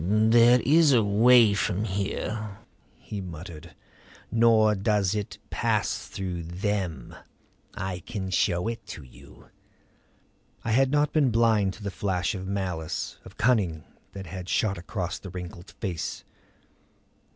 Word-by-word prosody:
"There 115 +5 +5
is 150 +3 +5
a 115 -3 +4
way 110 +2 +5
from 100 0 -1
here," 100 +1 -3 0.4
he 105 -2 -7
muttered. 85 -2 -9 0.6
"Nor 115 -2 +4
does 100 -1 +1
it 105 -2 -4
pass - - -1
through 90 -3 -5
Them. 90 - -3 0.6
I 95 -1 -4
can 95 +1 -5
show 90 +1 +1
it 115 0 -4
to 75 - -8
you." 65 - -17 1.1
I 115 - -2
had 135 +4 +4
not 145 +1 +1
been 150 -4 +3
blind 110 -4 +2
to 105 - -12
the 100 - -3
flash 95 0 -1
of 95 -2 -6
malice, 90 -5 -3
of - - -14
cunning, 100 -11 +1 0.3
that 95 -1 -7
had 90 +1 -7
shot 100 -4 0
across 90 0 -4
the 95 - -9
wrinkled 90 0 -8
face. 90 -8 -4
100 Hz, 135 wpm, -26 LUFS, 90-110 Hz, 1.1 s, There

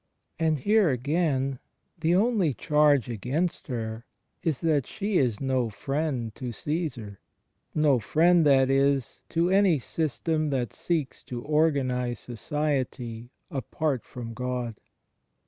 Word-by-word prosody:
And 160 -2 +2
here, 205 +5 +3
again, 135 0 0 0.4
the 165 +2 +2
only 195 - +2
charge 150 -4 +3
against 130 - -2
her 115 -3 -4 0.3
is 155 -6 0
that 155 -5 +1
she 205 -3 0
is 120 -6 +1
no 130 -3 0
friend 135 -1 -2
to 125 +1 -5
Caesar 130 - -4 0.3
— - - -49
no 150 -4 +4
friend, 170 +7 +4
that 135 -2 +5
is, 135 -1 +1
to 170 +2 +1
any 190 -4 +5
system 155 +3 -1
that 130 -4 -1
seeks 155 -7 -2
to 120 -1 -6
organize 135 -6 +1
society 125 -2 -3 0.2
apart 140 -1 -2
from 115 -2 -8
God. 125 -1 -3
140 Hz, 125 wpm, -27 LUFS, 125-160 Hz, 0.4 s, that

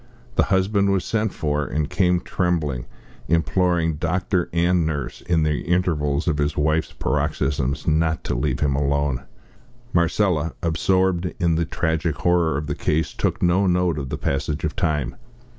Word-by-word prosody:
The - - +3
husband 100 +1 +2
was 95 -2 0
sent 110 -2 0
for, 75 -1 -1
and 75 0 -2
came 90 0 +2
trembling, 75 -9 -1 0.4
imploring 85 0 +1
doctor 90 +2 0
and 85 +1 +2
nurse, 75 -5 -3
in 85 -3 +1
the 75 -1 +1
intervals 80 -5 0
of 75 -3 +1
his 75 +1 0
wife's 75 +2 +1
paroxysms, 70 0 -1
not 80 +1 +1
to - - -2
leave - - -1
him 70 -2 +2
alone. 70 -2 0 0.7
Marcella, 85 -2 +1
absorbed 90 +1 +1
in 85 -1 +2
the 80 +1 +1
tragic 80 -1 -1
horror 85 -4 +2
of 75 - -3
the 75 - -2
case, 80 +2 -1
took - - -1
no 90 +3 +3
note 90 -3 +1
of 70 -2 -5
the - - -3
passage 70 +2 -2
of 75 - -2
time. 75 -9 -1
80 Hz, 160 wpm, -22 LUFS, 75-90 Hz, 0.7 s, The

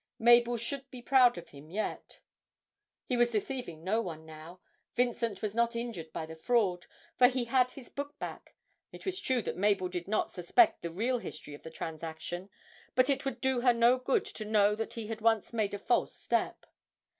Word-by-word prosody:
Mabel 240 +1 +5
should 270 +4 -4
be 250 -2 -10
proud 250 -2 +5
of 170 - -9
him 145 +2 -13
yet! 210 +5 -4 0.8
He 250 - -1
was 240 0 +4
deceiving 220 - -4
no 215 +5 +1
one 160 -5 -7
now, 160 +3 -11 0.4
Vincent 235 -4 0
was 210 -2 -1
not 235 +1 +1
injured 230 -10 -5
by 160 - -4
the 160 0 -9
fraud 185 -1 +1 0.3
for 250 - +9
he 250 -1 -1
had 250 +1 +3
his 255 -1 -12
book 285 +1 -6
back; - - -8 0.4
it - - -12
was 380 0 -1
true 260 - 0
that - - -4
Mabel 195 -2 +2
did 180 -1 -5
not 215 +2 0
suspect 320 - +3
the 170 - -3
real 235 +9 0
history 155 -8 -8
of 145 - -10
the 160 - -8
transaction, 160 +3 -6 0.5
but 255 +2 +4
it 275 0 -1
would 270 - -3
do 265 -2 +1
her 245 -1 +5
no 240 +2 +5
good 255 +1 +1
to 215 - -6
know 210 -1 +3
that 225 +1 -4
he 230 -2 -5
had 220 0 -5
once 225 0 +2
made 210 -3 0
a - - -3
false 200 - 0
step. - - -1
225 Hz, 200 wpm, -31 LUFS, 180-245 Hz, 0.8 s, for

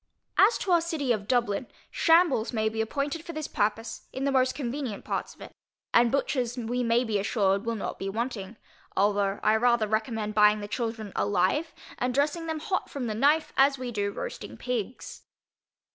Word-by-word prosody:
As 420 +4 +6
to 380 - -2
our 345 -1 +5
City 320 -6 -1
of 205 -3 -1
Dublin, 235 -2 +1 0.2
shambles 325 -8 +3
may 220 -2 +1
be 220 0 -2
appointed 285 +7 -2
for 335 - -7
this 310 -1 -4
purpose, 215 +2 -2
in 265 - -4
the 280 - +1
most 255 -1 +2
convenient 260 -4 -4
parts - - -3
of - - -21
it, - - -9 0.4
and 235 0 +5
butchers 255 -3 0
we 245 +1 -2
may 235 +1 +2
be 220 -4 0
assured 200 0 +1
will 230 - 0
not 210 - -5
be 195 - -3
wanting; 220 -1 -4 0.4
although 200 0 +2
I 215 - +4
rather 240 -1 +3
recommend 215 0 -1
buying 210 0 +5
the 205 - -6
children 225 -2 -4
alive, 205 - +1 0.3
and 250 0 -1
dressing 300 +4 0
them 320 -1 -3
hot 375 +3 -2
from 275 -3 -4
the 220 - -2
knife, 300 +7 +2
as 275 +1 +4
we 250 -1 -5
do 205 -2 -1
roasting - - -6
pigs. 250 -1 -4
240 Hz, 190 wpm, -27 LUFS, 215-280 Hz, 0.4 s, As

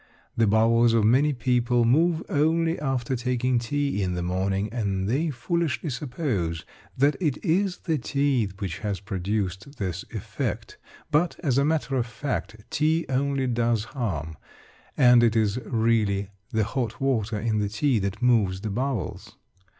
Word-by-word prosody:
The 115 -1 +3
bowels 115 +2 +4
of 115 -2 +3
many 130 +7 +4
people 120 -2 +1
move 160 +7 +3
only 165 +3 +1
after 130 -3 -1
taking 125 0 0
tea 140 -1 -1
in 90 -2 -1
the 90 - -2
morning, 95 +3 -1
and 100 -5 -1
they 145 +9 +1
foolishly 155 +3 -1
suppose 120 - -2 0.3
that 140 +2 +3
it 150 -7 0
is 185 +2 +1
the 160 -4 -1
tea 135 -4 +1
which 95 -5 -4
has 100 -3 -3
produced 100 +4 -3
this 95 -3 -3
effect. 110 -5 -4 0.3
But, 160 +4 +1
as 135 -4 +2
a 140 - +3
matter 150 -3 0
of 120 -1 0
fact, 115 -1 -4 0.2
tea 160 +2 +1
only 135 0 0
does 120 -3 +1
harm, 90 - -4 0.6
and 125 -2 +7
it 115 -1 +3
is 110 +1 +1
really 110 -4 +1 0.2
the 110 -1 +1
hot 115 +3 -3
water 115 -6 0
in 110 0 0
the 105 -1 0
tea 120 +3 +1
that 100 +3 -3
moves 105 -7 +3
the 110 - -3
bowels. 125 0 -3
120 Hz, 155 wpm, -25 LUFS, 105-140 Hz, 0.6 s, and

